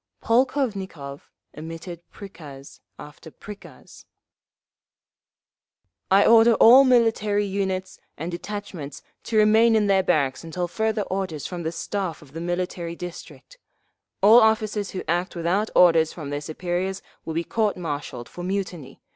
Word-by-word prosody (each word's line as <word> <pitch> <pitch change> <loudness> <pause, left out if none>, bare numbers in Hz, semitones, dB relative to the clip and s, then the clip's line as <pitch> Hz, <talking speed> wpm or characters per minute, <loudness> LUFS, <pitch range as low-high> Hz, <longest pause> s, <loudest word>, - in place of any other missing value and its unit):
Polkovnikov 210 - -1 0.2
emitted 165 +2 -8
prikaz 150 -9 -12 0.2
after 150 +2 -12
prikaz: 205 +5 -13 2.0
I 195 +2 +5
order 230 0 +6
all 250 +6 +8
military 225 -5 +2
units 190 -1 -3 0.2
and 165 +3 -5
detachments 175 -6 -7 0.2
to 225 - -1
remain 220 +2 +5
in 215 -1 +3
their 195 -1 +3
barracks 140 -8 0
until 175 +2 -4
further 220 +3 -1
orders 185 -6 -4
from 180 -2 -5
the 160 -1 -3
Staff 170 0 -4
of 140 - -18
the 165 +2 -7
Military 175 -1 -3
District…. 180 - -10 0.6
All 225 +4 +8
officers 215 -2 +1
who 185 - -5
act 175 +3 -1
without 180 +6 0
orders 165 -3 +5
from 150 -4 -7
their 145 0 -3
superiors 180 +5 -4 0.2
will 160 - -6
be 165 - 0
court 215 +2 -1
martialled 145 -7 -5
for 175 - -9
mutiny. 180 -7 -5
185 Hz, 130 wpm, -24 LUFS, 165-210 Hz, 2.0 s, all